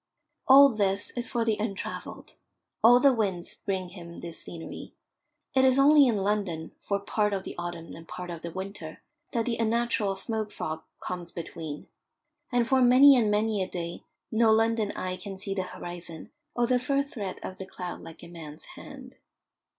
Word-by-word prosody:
All 275 +1 +9
this 205 -4 0
is 245 0 -3
for 235 -3 0
the 220 -2 +1
untravelled. 210 -2 -5 0.5
All 240 +2 +8
the 275 0 +5
winds 195 -7 -1
bring 190 -3 -2
him 170 -2 -10
this 170 -1 -8
scenery. 165 -1 -9 0.6
It 265 0 +4
is 260 0 +5
only 285 0 +7
in 230 -4 +2
London, 195 -5 -1
for 200 0 -1
part 210 +1 0
of 190 -1 -2
the - - -6
autumn 175 -1 -6
and 165 0 -11
part 180 -1 -6
of 165 -1 -7
the 170 - -5
winter, 190 -3 -7 0.3
that 230 -1 0
the 235 -2 -1
unnatural 230 -3 +1
smoke 215 +2 -3
fog 160 0 -4 0.2
comes 175 -1 -5
between. 160 -3 -7 0.7
And 240 -2 +2
for 265 0 +3
many 260 +3 +8
and 230 -4 +3
many 210 0 +1
a 185 - -1
day 170 -1 -5 0.3
no 225 0 +4
London 225 -1 +2
eye 185 0 -3
can 190 +1 -7
see 195 +1 -4
the 195 - -1
horizon, 175 -2 -8 0.2
or 240 - +2
the 250 +1 +2
first 275 +3 -1
threat 200 -6 -4
of 185 - -7
the 190 - -6
cloud 180 -2 -6
like 165 0 -11
a - - -9
man's 160 -3 -10
hand. - - -11
200 Hz, 180 wpm, -28 LUFS, 175-235 Hz, 0.7 s, All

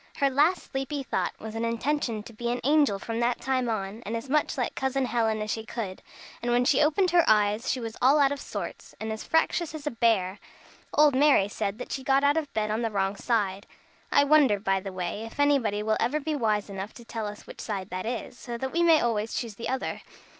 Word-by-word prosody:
Her 275 -1 +2
last 305 +7 +2
sleepy 270 +1 -3
thought - - -1
was 220 0 -7
an 225 +1 -3
intention 230 -1 -1
to 230 - -12
be 235 +2 -3
an 245 +1 -1
angel 285 -6 +3
from 225 +3 -4
that 240 0 +1
time 255 -2 0
on, 210 0 -3
and 225 +3 -3
as 255 +4 -7
much 300 -1 +1
like 250 - -1
Cousin 265 0 0
Helen 225 -3 0
as 215 - -3
she 220 - -3
could; 215 -5 -5 0.4
and 240 - -2
when 245 +1 +3
she 270 0 +4
opened 320 +5 +3
her 345 -1 +5
eyes 210 +2 +3
she 255 - 0
was 225 -1 -5
all 270 +4 +6
out 280 -2 +4
of 285 - -3
sorts, - - -7
and 220 0 -4
as 220 - -6
fractious 320 0 +1
as 305 -1 -8
a 295 - -1
bear! 210 -5 +1 0.5
Old 300 -1 +5
Mary 270 -7 +5
said 205 0 -3
that 250 - -7
she 265 - -3
got 270 +1 +3
out 285 +1 +4
of 315 -3 -2
bed 215 -1 -1
on 220 +2 -1
the 230 - 0
wrong 195 -1 0
side. 200 -3 -1 0.4
I - - +5
wonder, 285 -8 +4
by 195 -1 +1
the 195 0 -6
way, 185 +3 -4
if 225 +4 -10
anybody 250 -8 +2
will 215 0 +1
ever 300 +6 +1
be 305 +1 -2
wise 215 -6 0
enough 200 +1 -6
to 235 - -12
tell 225 -2 -4
us 205 0 -9
which - - -10
side 200 -3 -4
that 185 +3 -4
is, 245 +1 -4
so 240 -1 -6
that 265 +2 -3
we 340 - +1
may 330 -2 +5
always 225 -2 -1
choose 230 -3 -3
the 230 +3 -5
other? 260 0 -3
235 Hz, 240 wpm, -27 LUFS, 215-275 Hz, 0.5 s, all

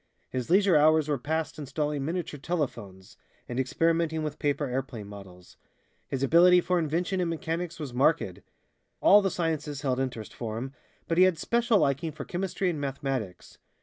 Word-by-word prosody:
His 125 -2 -3
leisure 190 0 +4
hours 155 0 +5
were 145 -3 0
passed 160 +4 -3
installing 145 0 -2
miniature 165 -1 -3
telephones, 120 - -4 0.3
and 120 +1 -3
experimenting 165 +3 +1
with 150 -1 -4
paper 145 0 0
airplane 125 -4 -4
models. 95 -3 -12 0.5
His 135 -1 -3
ability 175 +5 +6
for 180 0 +1
invention 170 +4 -1
and 175 - 0
mechanics 165 +1 -3
was 145 -5 -6
marked. 130 - +1 0.6
All 205 +1 +7
the 195 - +1
sciences 160 -5 -2
held 130 -2 0
interest 125 -5 -4
for 110 -2 -5
him, 130 +3 -5 0.3
but 165 +1 +1
he 185 - +8
had 185 -3 +2
special 235 +5 +2
liking 155 0 +1
for - - -7
chemistry 190 +1 -2
and 160 -5 -1
mathematics. 135 -8 -4
150 Hz, 165 wpm, -28 LUFS, 130-170 Hz, 0.6 s, he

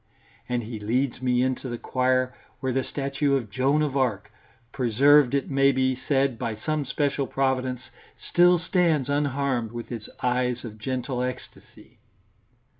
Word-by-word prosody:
And 120 -1 -1
he 110 0 -6
leads 120 +5 -1
me 125 -1 +2
into 130 0 -2
the 120 - -4
choir 130 +1 0 0.2
where 130 -1 -1
the 130 +1 0
statue 140 +1 -1
of 120 -7 -3
Joan 135 +6 +2
of 145 -3 -2
Arc, 115 -7 0 0.4
preserved 135 +3 +4
it 140 - -1
may 135 0 +4
be 130 -1 +1
said 135 -2 0
by 115 -2 -2
some 150 +6 -2
special 140 0 -1
Providence, 130 -2 -1 0.4
still 175 0 +4
stands 165 -5 +1
unharmed, 140 -5 0
with 120 +1 -7
its 115 -3 -6
eyes 125 0 0
of 110 -1 -9
gentle 130 +2 -3
ecstasy. 125 0 -8
130 Hz, 150 wpm, -25 LUFS, 125-140 Hz, 0.4 s, preserved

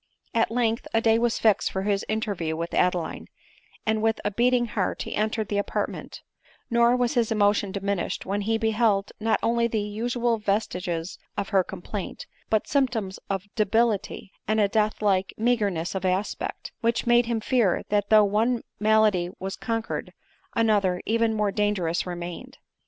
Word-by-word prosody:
At 230 0 +2
length 230 -1 0
a - - +5
day 225 0 +4
was 235 0 +1
fixed 215 -3 +3
for 190 - -2
his 200 -1 0
interview 200 -7 -1
with 170 +1 -4
Ade 180 0 +3
line, 170 -2 -5 0.6
and 220 0 +1
with 225 0 +1
a 205 - +1
beating 240 +3 +2
heart 210 -5 -2
he - - -6
entered 215 0 0
the 205 +1 0
apartment; 205 - -4 0.5
nor 235 +1 +4
was 245 +1 +1
his 235 -4 +1
emotion 205 -2 +2
diminished 200 -2 -2
when 200 +2 -1
he 225 +2 +1
beheld 220 -3 +1
not 220 -1 +1
only 235 0 +2
the 225 - -2
usual 230 +3 -1
vestiges 180 -5 -2 0.2
of 200 - -2
her 195 -3 +3
complaint, 190 +2 -6 0.2
but 220 -1 +1
symptoms 240 -9 0
of 195 -1 -2
debility, 215 -2 0 0.2
and 215 +1 +2
a 205 - +4
death 215 +1 0
like 190 -2 +1
meagerness 205 -8 0
of 190 -1 -3
aspect, 185 +2 -2
which 230 0 +1
made 240 0 +4
him 235 -1 0
fear 220 -5 +1
that 205 -1 +1
though 215 -1 +7
one 225 +4 +1 0.2
malady 215 -5 +3
was 190 +1 -4
conquered, 225 -1 -3 0.4
another, 205 -5 +2
even 230 0 +2
more 210 -2 +1
dangerous 190 -5 0
remained. 175 +9 -6
215 Hz, 165 wpm, -25 LUFS, 195-230 Hz, 0.6 s, though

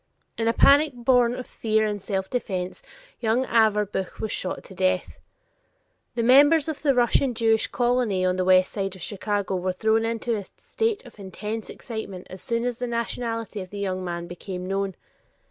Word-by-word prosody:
In 225 - -1
a - - +5
panic 285 +3 +5
born 245 0 +3
of 255 - -6
fear 220 -1 0
and 205 -1 -2
self 190 -1 -2
defense, 190 - -3 0.4
young 235 +3 +1
Averbuch 210 -5 +1
was 220 - -3
shot 185 - -3
to - - -12
death. 185 0 0 1.0
The 235 - 0
members 285 +5 +6
of 315 -3 -4
the 280 -3 +3
Russian 245 +1 +2
Jewish 225 -1 +2
colony 240 -6 +1
on 180 0 +2
the 185 - 0
west 185 0 +5
side 195 -2 -3
of 185 - -9
Chicago 200 -2 -2
were 185 +1 -1
thrown 220 +4 +2
into 230 0 -1
a 205 - -4
state 450 -7 -2
of 235 -3 -15
intense 210 +3 -5
excitement 220 -6 -7
as 185 - -8
soon 230 0 -1
as 245 -1 -2
the 245 - -2
nationality 230 -2 -3
of 185 - -8
the 205 - -8
young 185 -2 -2
man 170 -1 -4
became 180 +1 -7
known. 195 0 -2
220 Hz, 180 wpm, -25 LUFS, 190-240 Hz, 1.0 s, members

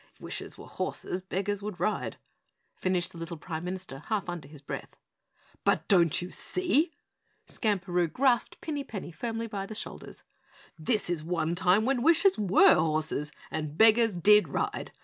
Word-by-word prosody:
'If - - -30
wishes - - -5
were - - -10
horses, 185 - -4
beggars 195 +2 -2
would 205 -3 -6
ride!'" 215 - -1 0.6
finished 185 -2 0
the 170 - -11
little 165 0 -6
Prime 160 +1 -5
Minister 180 -6 -5
half 215 -5 -1
under 170 -6 -5
his 150 0 -13
breath. - - -6 0.7
"But - - +2
don't 175 -4 +4
you 180 - -7
see?" 350 -3 +1 0.5
Skamperoo 180 -5 0
grasped 250 -3 +1
Pinny 295 -3 -3
Penny 200 -8 -7
firmly 225 +7 -3
by 200 -3 -5
the 215 - -7
shoulders. 220 - -8 0.5
"This 200 +7 0
is 175 -3 -1
one 165 -1 -1
time 185 +4 +3
when 260 -1 +1
wishes 335 +6 +5
WERE 200 -2 +6
horses 155 -1 0 0.2
and 155 -1 -4
beggars 225 -1 +5
DID 210 +4 +6
ride. - - -2
190 Hz, 160 wpm, -29 LUFS, 170-220 Hz, 0.7 s, WERE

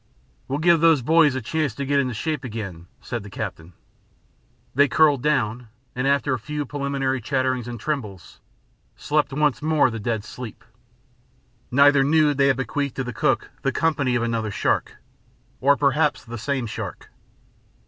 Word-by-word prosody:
"We'll 135 - -2
give 170 +2 +4
those 160 -5 +4
boys 155 -1 +4
a 130 - -3
chance 150 -2 -1
to 140 - -4
get 140 +1 +2
into 130 -4 -1
shape 150 +3 -3
again," 100 -8 -6
said 120 -2 -4
the 100 - -10
captain. 90 -5 -6 1.0
They 145 +3 +4
curled 145 -1 +3
down 125 -5 0 0.3
and, 125 +2 -1
after 140 -1 +2
a 130 - -2
few 150 +6 -4
preliminary 140 -2 -2
chatterings 130 -1 -1
and 120 -1 -6
trembles, 110 - -5 0.6
slept 150 -1 0
once 150 0 +1
more 155 -4 +3
the 115 - -5
dead 110 0 -2
sleep. 115 0 -9 1.1
Neither 140 +1 +5
knew 150 +1 +3
they 140 0 +3
had 135 - +2
bequeathed 140 +2 -2
to 135 - -2
the 125 -1 -6
cook - - 0
the - - 0
company 140 -6 +1
of 120 - +1
another 115 -2 -1
shark, - - -1 0.6
or 140 +2 +4
perhaps 145 +1 +1
the 120 0 -7
same 130 +3 -2
shark. 110 - -7
135 Hz, 165 wpm, -23 LUFS, 120-145 Hz, 1.1 s, Neither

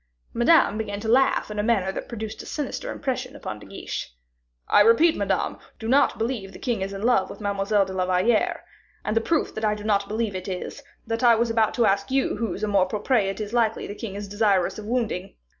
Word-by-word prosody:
Madame 240 -3 +4
began 205 -2 -3
to 220 - -5
laugh 255 -1 +3
in 210 - -4
a - - +1
manner 205 -4 +1
that - - -6
produced 220 -2 -6
a - - -11
sinister 305 - -4
impression 260 -1 -3
upon 110 - -6
De - - -13
Guiche. - - -6 0.6
"I - - +5
repeat, 230 +10 +5
Madame, - - -1
I - - -25 0.2
do 225 - -6
not 275 +4 +3
believe 225 -4 -3
the - - -9
king 235 -6 -2
is 195 +1 -2
in 200 +1 -6
love 225 -6 +3
with - - -9
Mademoiselle 200 0 +1
de 190 - -7
la 185 -1 -1
Valliere; 185 +5 +1 0.4
and 215 - -1
the 225 - +3
proof 320 +6 0
that 220 - -6
I 210 -1 +2
do 210 - -9
not 200 -2 +1
believe 220 -1 -2
it 185 +1 -5
is, 185 +8 -5 0.2
that 225 0 -2
I 235 -1 +7
was 230 +1 +1
about 225 -1 +2
to 235 - +3
ask 200 0 +1
you 265 -4 +1
whose 210 -2 -3
amour 200 -3 +2
propre 210 +2 +1
it 195 - -5
is 215 +1 -5
likely 230 -2 +1
the - - -6
king 205 -2 -7
is 205 0 -5
desirous 205 -2 +1
of 210 - -8
wounding? 225 -6 -2
215 Hz, 235 wpm, -24 LUFS, 200-235 Hz, 0.6 s, I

